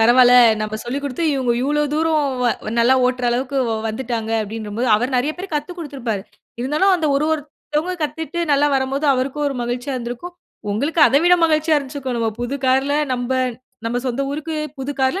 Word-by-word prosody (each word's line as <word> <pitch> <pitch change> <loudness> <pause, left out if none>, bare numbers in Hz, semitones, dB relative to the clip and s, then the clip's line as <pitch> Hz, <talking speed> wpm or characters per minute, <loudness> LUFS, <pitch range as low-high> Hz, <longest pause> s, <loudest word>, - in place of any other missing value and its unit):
பரவால்ல 245 +2 +6 0.3
நம்ம 215 0 -3
சொல்லி 255 +4 -2
குடுத்து 285 +4 -3
இவங்க, 255 -3 +1
இவ்ளோ 295 +2 +1
தூரம் 315 -1 +2 0.2
வ - - +2 0.3
நல்லா 240 +3 +5
ஓட்டுற 250 0 -1
அளவுக்கு 255 +3 -2
வ- 225 - 0 0.2
வந்துட்டாங்க 225 -1 -3
அப்டின்றபோது, 220 +2 -4
அவரு 245 +5 -1
நெறைய 270 +5 +1
பேர்க்கு 370 -3 -6
கத்துக்கொடுத்திருப்பாரு. 290 - -4 0.4
இருந்தாலும், 305 +10 +2
அந்த 325 -3 -1
ஒரு 290 - +1
ஒருத்தவங்க 305 +3 -3
கத்துட்டு 320 +3 -4
நல்லா 285 +1 +4
வரம்போது, 270 +3 -1
அவருக்கும் 275 +3 -1
ஒரு 275 - -5
மகிழ்ச்சியா 245 +3 -3
இருந்திருக்கும். 245 +9 -6 0.4
உங்களுக்கும் 295 +8 +3
அத 275 - +2
விட 355 0 +7
மகிழ்ச்சியா 315 0 +2
இருந்திருக்கும் 270 -3 -3
"நம்ம 225 -1 0
புது 245 +3 -2
கார்ல 265 +2 +2 0.2
நம்ப 245 0 -2 0.5
நம்ம 230 +2 -1
சொந்த 255 +2 -1
ஊருக்கு 310 +3 -4 0.2
புது 270 +2 -3
கார்ல 265 +8 +1
270 Hz, 170 wpm, -20 LUFS, 245-300 Hz, 0.5 s, விட